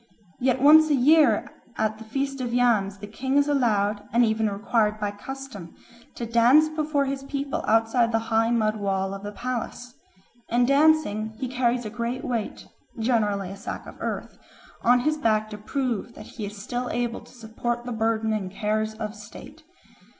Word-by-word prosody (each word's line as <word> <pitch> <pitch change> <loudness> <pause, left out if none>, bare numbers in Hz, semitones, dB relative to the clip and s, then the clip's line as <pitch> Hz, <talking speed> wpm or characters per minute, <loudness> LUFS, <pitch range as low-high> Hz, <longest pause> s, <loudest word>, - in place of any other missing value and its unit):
Yet 255 0 +1
once 310 +3 +7
a 295 - +4
year 280 -3 +4 0.3
at 215 0 -1
the - - -8
Feast 275 +4 -3
of 240 -1 -2
Yams 215 -5 +2
the 200 - -8
king 265 +6 -2
is 285 0 +4
allowed, 215 -7 +1
and 240 +1 +4
even 220 -1 +1
required 210 +1 0
by 205 -1 -1
custom, 205 -5 -9 0.4
to 235 - -4
dance 240 +7 +5
before 305 -2 0
his 270 0 -3
people 275 0 -3
outside 225 +1 +3
the 225 - +2 0.2
high 225 +1 +3
mud 220 -2 +1
wall 195 -1 -1
of 195 - -7
the 205 0 -6
palace. 245 +2 -5 0.6
In 240 +1 +3
dancing 275 -7 +2
he 260 - -3
carries 245 -1 0
a 215 - -5
great 235 +2 -3
weight, 230 -4 -3 0.3
generally 210 -5 0
a - - -7
sack 200 - -7
of - - -11
earth, - - -5 0.4
on 245 +1 +4
his 305 +4 0
back 215 -6 +1
to 210 - -6
prove 240 0 -3
that - - -10
he 215 -4 -7
is 205 +1 -9
still 245 +5 -4
able 240 0 -2
to - - -17
support 240 0 -4
the 250 - -4
burden 220 -1 0
and 200 -3 -2
cares 215 +2 -2
of 215 -1 -5
state. 225 +8 -12
235 Hz, 180 wpm, -25 LUFS, 215-260 Hz, 0.6 s, once